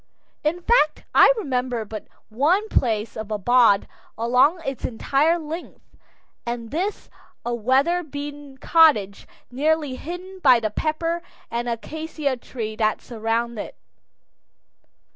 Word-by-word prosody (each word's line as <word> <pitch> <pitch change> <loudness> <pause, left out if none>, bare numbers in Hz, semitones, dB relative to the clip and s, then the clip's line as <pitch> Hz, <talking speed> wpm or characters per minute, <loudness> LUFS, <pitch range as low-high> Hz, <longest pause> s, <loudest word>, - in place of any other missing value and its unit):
In 340 +4 -1
fact, 460 -10 +3
I - - +8
remember 250 - -2
but 215 0 -8 0.2
one 315 - +2
place 225 - 0
of 220 -1 -6
abode 215 0 +3 0.3
along 250 +9 +3
its 270 -1 -4
entire 280 +7 +1
length, 325 +1 -8 0.5
and 235 -1 -5
this, 370 +7 -2 0.4
a 240 - -1
weather 265 +10 +2
beaten 290 -2 -8
cottage 265 - +3 0.2
nearly 295 0 0
hidden 365 +4 -8
by 250 -9 +6
the 215 -2 -2
pepper 330 +6 -1 0.3
and 240 +1 -2
acacia 300 +3 -3
trees 225 -3 -6
that 215 -1 +1
surround 230 0 -2
it. - - -6
265 Hz, 120 wpm, -23 LUFS, 230-315 Hz, 0.5 s, I